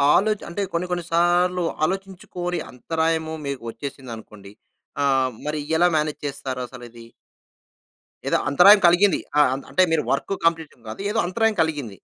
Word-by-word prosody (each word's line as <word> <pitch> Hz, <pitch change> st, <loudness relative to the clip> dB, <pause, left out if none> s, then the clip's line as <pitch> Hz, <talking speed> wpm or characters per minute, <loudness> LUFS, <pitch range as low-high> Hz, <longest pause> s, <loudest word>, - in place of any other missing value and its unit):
ఆలోచ 210 Hz, +2 st, +2 dB
అంటే 170 Hz, +4 st, -4 dB
కొన్ని 175 Hz, +2 st, -1 dB
కొన్ని 175 Hz, -1 st, -2 dB
సార్లు 175 Hz, +1 st, +2 dB, 0.2 s
ఆలోచించుకోని 180 Hz, -1 st, -3 dB
అంతరాయము 160 Hz, +4 st, -1 dB
మీకు 140 Hz, -3 st, -4 dB
ఒచ్చేసిందనుకోండి, 115 Hz, -7 st, -9 dB, 0.5 s
ఆహ్, 135 Hz, -2 st, +2 dB, 0.2 s
మరి 150 Hz, 0 st, -2 dB, 0.2 s
ఎలా 175 Hz, +2 st, +4 dB
మేనేజ్ 150 Hz, -1 st, -1 dB
చేస్తారసలది? 125 Hz, -4 st, -7 dB, 1.2 s
ఏదో -, -, +2 dB
అంతరాయం 185 Hz, +9 st, +7 dB
కలిగింది. 175 Hz, +1 st, +4 dB, 0.2 s
ఆ! -, -, +8 dB
అంత్ 135 Hz, -, -6 dB
అంటే, 185 Hz, -, +3 dB
మీరు 160 Hz, -2 st, +2 dB
వర్కు 140 Hz, +8 st, -1 dB
కంప్లీషన్ 160 Hz, -8 st, -3 dB
కాదు, 110 Hz, -, -7 dB
ఏదో 225 Hz, -, +1 dB
అంతరాయం 220 Hz, +3 st, 0 dB
కలిగింది. 150 Hz, -8 st, -4 dB
160 Hz, 135 wpm, -23 LUFS, 135-180 Hz, 1.2 s, ఆ